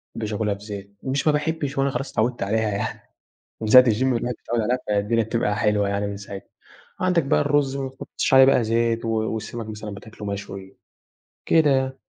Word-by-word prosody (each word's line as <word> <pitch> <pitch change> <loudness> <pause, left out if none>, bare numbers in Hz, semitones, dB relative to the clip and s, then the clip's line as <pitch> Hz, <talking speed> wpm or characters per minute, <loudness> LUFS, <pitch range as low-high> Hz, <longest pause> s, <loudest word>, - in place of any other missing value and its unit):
ما - - -5
أحبّش 105 0 -3
آكُلها 105 -1 0
بزيت، 100 -1 -9
مش 135 +3 -1
ما 150 - +5
باحبّش 150 -2 -2
هو - - +3
أنا 140 - +1
خلاص 130 +2 -4
اتعوِّدت 120 -1 0
عليها 110 +2 0
يعني 100 -1 -3 0.6
من 110 - -3
ساعة 125 +3 +10
الgym 115 +1 +1
والواحد 125 -2 0
متعوِّد 120 0 -1
عليها، 125 +4 +1
فالدنيا 105 +3 +1
بتبقى 110 -2 -1
حلوة 105 -2 +1
يعني 100 +1 -1
من 100 - -4
ساعتها. 100 -1 -9 0.5
عندك 180 -2 +2
بقى - - +2
الرُز 145 -2 +1
ما 135 -1 -3
تحُطّش 135 0 -2
عليه 130 - +9
بقى 130 -3 +4
زيت 115 +1 0
و 115 - -2
والسَمَك 110 +1 -3
مثلًا 105 0 -6
بتاكُله 105 +1 -10
مشوي 100 -1 -6 0.7
كده 160 -2 +4
يعني. 130 0 0
115 Hz, 200 wpm, -23 LUFS, 105-130 Hz, 0.7 s, ساعة